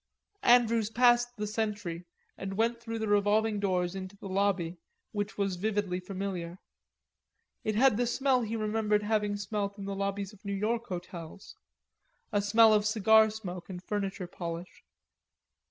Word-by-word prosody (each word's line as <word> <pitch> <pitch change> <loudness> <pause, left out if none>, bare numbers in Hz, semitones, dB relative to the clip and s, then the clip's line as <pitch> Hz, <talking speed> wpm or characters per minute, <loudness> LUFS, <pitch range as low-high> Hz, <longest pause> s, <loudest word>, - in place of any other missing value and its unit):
Andrews 230 -3 +4
passed 240 +1 +3
the 210 - -2
sentry 205 -5 -3 0.3
and 195 0 -5
went 230 +1 +1
through 230 -1 -4
the 220 -1 -2
revolving 205 +1 +2
doors 180 -3 0
into 190 +1 -7
the 195 - -8
lobby, 190 -3 0 0.3
which 205 -1 -3
was 195 -3 0
vividly 200 -2 -1
familiar. 185 -2 -5 1.1
It 215 - -1
had 250 -1 +4
the 245 0 +1
smell 260 +1 +2
he 225 0 -3
remembered 215 -1 +1
having 210 -1 0
smelt 200 0 -3
in 200 - -6
the 200 - -3
lobbies 200 +1 -3
of 205 - -18
New 200 -1 -3
York 225 +4 -1
hotels, 175 -1 -8 0.8
a 205 -2 +2
smell 220 +2 +6
of 210 0 +3
cigar 220 +1 +5
smoke 185 -5 -7
and 180 -1 -7
furniture 195 -2 -3
polish. 170 0 -7
205 Hz, 155 wpm, -30 LUFS, 195-220 Hz, 1.1 s, smell